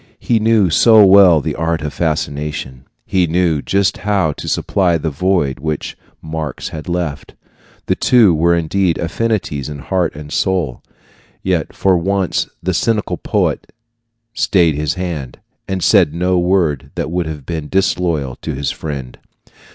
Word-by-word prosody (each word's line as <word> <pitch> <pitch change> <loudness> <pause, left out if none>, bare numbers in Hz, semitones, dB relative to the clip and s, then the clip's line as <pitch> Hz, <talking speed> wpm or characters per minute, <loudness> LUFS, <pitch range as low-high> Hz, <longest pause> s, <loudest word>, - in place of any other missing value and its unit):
He 115 -2 +1
knew 110 -5 +3
so 110 +4 +6
well 95 -5 +6
the - - -3
art 80 -1 -2
of 75 -2 -4
fascination; 70 -4 -3 0.2
he 90 -2 +1
knew 85 -2 +1
just 100 +4 0
how 95 -5 0
to - - -8
supply 90 -4 +1
the 80 0 -3
void 75 -4 0
which 75 +1 -4 0.3
Marx 80 -3 -5
had 80 +2 -7
left. 85 -5 -4 0.5
The - - +1
two 115 -8 +4
were 85 +2 +3
indeed 85 +1 0
affinities 85 -6 -2
in 75 - -6
heart 90 +4 -1
and 75 0 -8
soul; 90 -10 -1 0.6
yet - - -1
for 95 -2 +2
once 95 +1 -1
the 95 +2 0
cynical 110 +4 0
poet - - -1 0.6
stayed 85 -8 +2
his 75 +3 -2
hand, 85 -9 -5 0.3
and 95 -2 -3
said 75 - +4
no 90 +1 +1
word 85 -6 0
that 75 - -3
would 90 -1 -1
have 75 -4 -7
been 80 -2 -5
disloyal 85 -8 0
to - - -5
his 70 +1 -2
friend. 70 -5 -6
85 Hz, 150 wpm, -17 LUFS, 75-95 Hz, 0.6 s, so